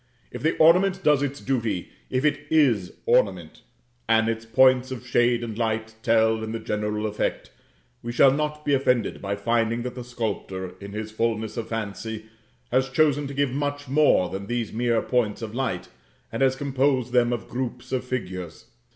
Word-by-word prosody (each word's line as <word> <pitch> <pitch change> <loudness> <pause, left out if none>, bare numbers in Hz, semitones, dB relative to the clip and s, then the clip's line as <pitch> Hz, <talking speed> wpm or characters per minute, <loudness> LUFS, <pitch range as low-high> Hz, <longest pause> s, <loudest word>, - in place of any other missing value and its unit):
If 125 - -7
the 160 +2 +1
ornament 185 +4 +4
does 150 -3 +4
its 140 0 -2
duty 115 -9 -2 0.2
if 130 +3 0
it 145 -1 0
is 125 - +3
ornament, - - +1 0.5
and 110 0 +4
its 115 0 -3
points 130 +2 +4
of 125 -2 -7
shade 120 -1 +2
and 115 -2 -5
light 110 -1 -2
tell 110 -1 +3
in 110 0 -4
the 115 - -3
general 105 0 -2
effect, 105 -1 -2 0.5
we 120 - -4
shall 130 +3 +6
not 150 +1 -2
be 145 - +2
offended 125 -4 +1
by 100 0 -2
finding 115 +2 0
that 125 0 -4
the 125 - -7
sculptor 100 -6 -4
in 100 0 -9
his 110 0 -5
fulness 110 -1 -1
of 115 - -4
fancy 110 0 -5 0.5
has 130 +1 +2
chosen 145 0 +2
to 140 - -7
give 140 -2 +1
much 145 +1 -3
more 140 -9 +4
than 95 +2 -6
these 120 -2 -2
mere 115 0 +1
points 115 -3 0
of 110 -1 -6
light, 115 -9 -2 0.4
and - - -4
has 130 -1 +4
composed 135 -2 0
them 120 -1 +4
of 120 -2 -3
groups 125 0 -5
of 130 -1 -1
figures. 90 -10 -6
120 Hz, 180 wpm, -25 LUFS, 110-135 Hz, 0.5 s, shall